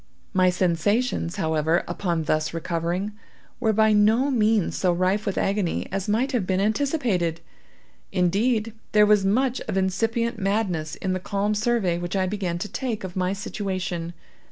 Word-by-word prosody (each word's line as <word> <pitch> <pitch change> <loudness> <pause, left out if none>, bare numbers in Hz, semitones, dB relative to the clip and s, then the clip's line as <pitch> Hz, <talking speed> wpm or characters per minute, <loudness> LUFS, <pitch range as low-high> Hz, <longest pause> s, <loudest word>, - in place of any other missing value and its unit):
My 185 -1 +4
sensations, 180 +2 0
however, 160 -2 +1
upon 175 -2 -1
thus 155 +1 0
recovering, 170 +4 -2 0.5
were 225 -3 +2
by 220 0 +4
no 220 +7 +4
means 220 -5 +2
so 185 - +2
rife 185 +4 0
with 200 - -1
agony 195 -3 0
as 195 +2 -3
might 240 +6 +1
have 230 -9 -1
been 185 -1 +1
anticipated. 215 - 0 0.7
Indeed, 215 +5 +1 0.2
there 210 0 +6
was 210 -1 +4
much 250 +6 +1
of - - -2
incipient 225 +5 0
madness 190 -6 -1
in 190 -1 -2
the 185 - -1
calm 200 +3 -1
survey 210 -5 +1
which 175 +2 -4
I 190 -1 +2
began 185 -3 -2
to 190 - -4
take 235 -3 -3
of 185 -1 -6
my 185 0 0
situation. 185 -4 -4
195 Hz, 155 wpm, -24 LUFS, 175-220 Hz, 0.7 s, there